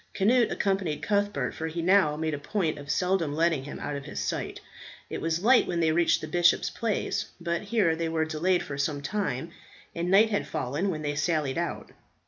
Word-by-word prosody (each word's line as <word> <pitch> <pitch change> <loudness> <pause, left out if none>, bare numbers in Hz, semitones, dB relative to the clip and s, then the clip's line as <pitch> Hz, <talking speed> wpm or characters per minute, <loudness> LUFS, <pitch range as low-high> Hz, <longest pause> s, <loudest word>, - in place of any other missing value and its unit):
Cnut 230 +3 +4
accompanied 190 -6 -1
Cuthbert, 205 0 0
for 160 - -4
he 165 +1 -4
now 180 -5 +4
made 160 0 -2
a 145 - -3
point 160 -2 -1
of 140 0 -10
seldom 180 -4 +1
letting 160 -4 +1
him 145 - -7
out 145 - -4
of 140 - -6
his - - -6
sight. - - -3 0.5
It - - -4
was 165 +2 -1
light 245 +3 +5
when 175 -1 -1
they 160 -1 +3
reached 170 +1 +2
the 155 - -5
bishop's 175 +2 +3
palace, 205 -2 -2
but 170 -1 -2
here 200 -6 +1
they 165 0 -2
were 160 -1 0
delayed 175 +3 +1
for 140 -1 -6
some 145 0 -1
time, 170 -4 -2 0.4
and 170 +1 -2
night 210 +4 +5
had 205 - -1
fallen 145 +10 -2
when 155 -4 -3
they 145 0 -1
sallied 150 -1 0
out. 170 - -4
170 Hz, 205 wpm, -27 LUFS, 155-195 Hz, 0.5 s, light